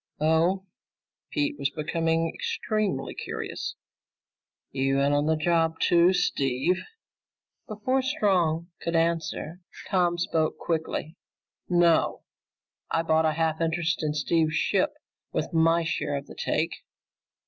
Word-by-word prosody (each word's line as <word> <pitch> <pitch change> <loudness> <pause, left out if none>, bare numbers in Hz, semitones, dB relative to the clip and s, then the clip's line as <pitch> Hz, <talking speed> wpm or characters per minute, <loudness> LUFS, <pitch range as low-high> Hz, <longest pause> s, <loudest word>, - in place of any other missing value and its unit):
"Oh?" 165 +5 +2 0.6
Pete 145 0 -1
was 140 0 +1
becoming 165 +2 0
extremely 205 - -2
curious. - - -5 1.0
"You 135 0 +1
in 140 +1 +2
on 145 +1 +2
the 160 - +3
job 165 0 +1
too, 175 +1 +5
Steve?" 170 -1 +1 0.9
Before 250 +4 0
Strong 185 - +1
could 170 - -2
answer, 165 0 -1 0.3
Tom 175 -3 +2
spoke 160 -2 0
quickly. 160 0 -3 0.5
"No, 175 -2 +3 0.7
I 165 - +1
bought 160 0 +3
a 155 - +1
half 160 0 0
interest 165 0 0
in 150 -1 -1
Steve's 155 +1 +1
ship - - +1 0.4
with - - -2
my 165 +1 +4
share 160 -3 -2
of 140 - -6
the - - -11
take." - - -1
165 Hz, 120 wpm, -27 LUFS, 155-175 Hz, 1.0 s, too